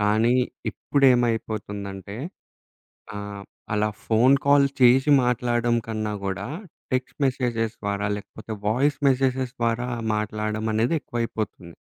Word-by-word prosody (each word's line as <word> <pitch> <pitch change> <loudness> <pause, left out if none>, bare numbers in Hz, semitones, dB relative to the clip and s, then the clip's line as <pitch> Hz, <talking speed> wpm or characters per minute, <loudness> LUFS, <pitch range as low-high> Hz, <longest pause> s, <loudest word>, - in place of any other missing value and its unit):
కానీ, 110 +4 +3 0.4
ఇప్పుడేమైపోతుందంటే 110 -7 0 1.0
ఆహ్, 100 -1 -6 0.3
అలా 105 0 +1 0.2
ఫోన్ 120 +5 +5
కాల్ 140 0 +5
చేసి 130 +3 +6
మాట్లాడ్డం 120 -1 +1
కన్నా 110 -1 -2
కూడా 95 +3 -3 0.5
టెక్స్ట్ 130 +3 -2
మెసేజెస్ 120 -4 -1
ద్వారా, 100 0 -1
లేకపోతే 105 +2 -9 0.2
వాయిస్ 135 +6 +2
మెసేజెస్ 130 -1 0
ద్వారా 115 +1 0 0.3
మాట్లాడ్డం 110 +1 -2
అనేది 115 +8 +1
ఎక్కువైపోతుంది. 110 - -4
115 Hz, 100 wpm, -24 LUFS, 105-125 Hz, 1.0 s, చేసి